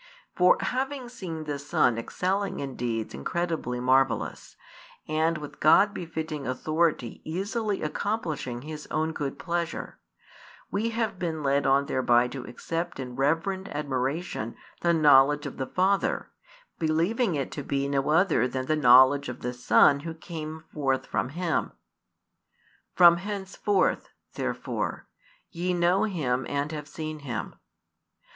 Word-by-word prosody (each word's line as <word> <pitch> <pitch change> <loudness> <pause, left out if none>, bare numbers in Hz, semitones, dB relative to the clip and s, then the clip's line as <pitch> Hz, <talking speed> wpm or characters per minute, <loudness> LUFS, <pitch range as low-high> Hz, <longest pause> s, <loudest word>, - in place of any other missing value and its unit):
For 180 0 +5
having 265 0 -2
seen 175 -10 -6
the 145 -2 -4
Son 140 -4 +2
excelling 190 - -2
in 135 -2 -5
deeds 115 -2 -3
incredibly 125 - -2
marvellous, 130 -2 +1 0.5
and 160 +1 +1
with 150 -1 -9
God 200 +7 +5
befitting 160 -5 -5
authority 155 -1 0
easily 200 +5 -2
accomplishing 155 - -3
His 155 0 -7
own 155 +1 0
good 140 -3 -4
pleasure, 170 -1 -3 0.7
we 215 +3 0
have 225 -4 -2
been 160 -4 -3
led 140 0 +2
on 135 +1 +4
thereby 125 -3 +3
to 135 -1 -6
accept 165 +7 -4
in 125 -2 -6
reverent 165 +8 0
admiration 140 -3 -3 0.2
the 170 - +2
knowledge 145 -2 +5
of 140 - -6
the 130 - -3
Father, 190 +2 0 0.5
believing 170 +6 +1
it 140 -2 -2
to 145 - -5
be 140 0 -1
no 140 0 0
other 160 -6 +3
than 130 0 -3
the 155 - +1
knowledge 130 0 +6
of 125 - -7
the 125 0 -3
Son 140 +3 +5
Who 160 +2 -6
came 160 -1 -7
forth 135 -3 0
from - - -2
Him. 170 +3 -1 1.2
From 170 -1 +8
henceforth, 195 0 -1 0.2
therefore, - - -3 0.5
ye 180 +1 -1
know 175 +3 +3
Him 135 -11 -1
and 145 +2 -1
have 150 -2 -6
seen 155 0 -6
Him. 120 -7 -5
155 Hz, 135 wpm, -27 LUFS, 135-175 Hz, 1.2 s, From